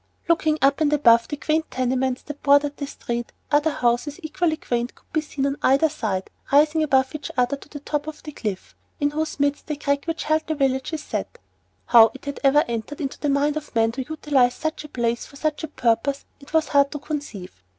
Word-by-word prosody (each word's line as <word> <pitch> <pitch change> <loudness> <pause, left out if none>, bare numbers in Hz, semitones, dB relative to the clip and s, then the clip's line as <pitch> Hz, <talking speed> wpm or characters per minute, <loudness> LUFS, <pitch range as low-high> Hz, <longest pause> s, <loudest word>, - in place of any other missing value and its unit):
Looking 315 -2 +2
up 275 +2 +3
and 300 -1 +3
above 235 -5 +5
the 295 - -4
quaint 315 +2 0
tenements 255 0 -1
that 295 -1 -8
bordered 285 0 +3
the 285 - -4
"street," 240 -3 -5 0.2
other 295 +2 +4
houses 245 +2 0
equally 315 0 0
quaint 240 -2 -2
could - - -28
be 315 - +2
seen 285 -2 -3
on 280 0 -1
either 275 +4 +4
side 210 -10 -3 0.2
rising 300 +3 +4
above 265 -3 +2
each 305 - -5
other 250 +2 +2
to 285 - -16
the 290 -1 -8
top 295 +1 -3
of 310 -1 -8
the 300 - -7
cliff, 210 -9 -5 0.2
in 290 -1 +1
whose 310 0 -3
midst 285 0 0
the 300 - -2
crack 280 0 -1
which 330 -1 -3
held 310 +1 0
the 315 - -1
village 265 -1 0
is 310 -2 -4
set. - - -4 0.5
How 225 -2 +7
it 280 +1 -6
ever 285 +2 +5
entered 235 +5 -4
into 275 -3 -4
the 295 - -1
mind 285 +2 +2
of 300 -4 -8
man 225 0 +3
to 255 +2 -5
utilize 275 -5 +2
such 315 0 -3
a 300 - -10
place 235 -3 -1
for - - -16
such 310 +2 -2
a - - -2
purpose 275 +1 0
it 280 - -15
was 320 -1 +2
hard 280 -1 +4
to - - -3
conceive. 275 - -6
285 Hz, 220 wpm, -23 LUFS, 255-305 Hz, 0.5 s, How